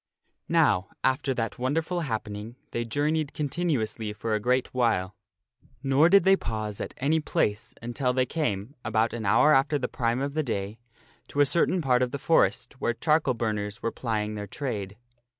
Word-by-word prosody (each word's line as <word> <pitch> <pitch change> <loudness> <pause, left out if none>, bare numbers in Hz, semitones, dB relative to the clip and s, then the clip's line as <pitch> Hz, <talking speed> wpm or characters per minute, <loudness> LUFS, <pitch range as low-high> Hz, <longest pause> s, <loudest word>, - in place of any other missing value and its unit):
NOW, 90 +1 +3 0.2
after 135 +1 +1
that 115 -1 -3
wonderful 160 +7 0
happening, 110 -5 -4 0.2
they 120 - -1
journeyed 145 +5 0
continu 150 -3 0
ously 110 -1 -4
for 110 +1 -3
a 105 - +1
great 125 +4 0
while. 115 -7 +1 0.7
Nor 140 +4 +4
did 195 0 +6
they 190 +1 +6
pause 110 - -4
at - - -6
any 150 +5 +2
place 105 -8 -1
until 125 +2 -1
they 130 0 +1
came, 125 -7 -2
about 110 0 +1
an 115 -3 -3
hour 150 +9 +5
after 145 +3 +3
the 130 - -2
prime 120 0 -1
of 140 +1 -2
the 155 - +1
day, 105 -5 -3 0.5
to 145 - -4
a 145 - +7
cer 170 +5 +2
tain 185 -3 0
part 125 -2 +3
of 125 - +2
the 140 - -4
forest 140 -2 +1
where 120 - 0
charcoal 150 -2 +2
burners 105 -2 -3
were 115 - 0
plying 110 -3 -2
their 105 -1 -5
trade. 105 -6 -4
125 Hz, 185 wpm, -27 LUFS, 110-145 Hz, 0.7 s, a